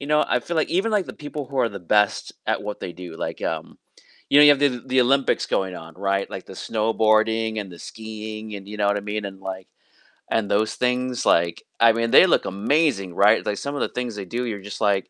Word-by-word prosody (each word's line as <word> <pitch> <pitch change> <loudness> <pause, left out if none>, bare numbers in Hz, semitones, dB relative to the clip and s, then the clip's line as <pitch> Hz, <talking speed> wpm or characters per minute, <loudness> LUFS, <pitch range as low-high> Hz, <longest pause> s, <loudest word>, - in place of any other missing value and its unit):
you 140 - -6
know, 150 0 +3
I - - +2
feel 170 - -5
like 155 - +1
even, 195 +6 +1
like, 205 -3 +1
the - - -7
people 145 -1 -5
who 135 -1 -5
are 120 - +3
the 100 -3 -8 0.2
best 105 -1 +1 0.2
at - - 0
what 105 0 -5
they 90 - -5
do, 85 -1 -9
like, - - -5
um - - -4 0.5
you 145 - +6
know, 150 - +9
you 145 - +9
have - - -6
the 125 -4 +1
the 130 0 +3
Olympics 135 +2 +2
going 95 -1 -1
on, 80 0 -11
right, 100 0 -1
like, - - -7
the - - -10
snowboarding, 110 0 +1
and 95 -3 -8
the 85 - -12
skiing, 110 -1 -8
and, 100 0 -9
you 105 - -7
know 105 -1 +1
what 100 0 +2
I - - -1
mean, 105 0 -3
and, 95 -1 -7
like 95 -1 -6 0.6
and 110 -3 0
those 110 +2 +1
things, 125 0 -1
like, 85 0 +2 0.2
I 115 -1 +6
mean, 115 0 -1
they - - +8
look - - +2
amazing, 100 - 0
right, 105 +3 +5
like, 100 - -1
some 140 +1 -4
of - - -3
the - - -2
things 125 -2 -3
they 100 -2 -6
do, 125 - 0
you're 105 -4 -4
just - - -7
like, 95 -1 0
110 Hz, 250 wpm, -23 LUFS, 100-125 Hz, 0.6 s, know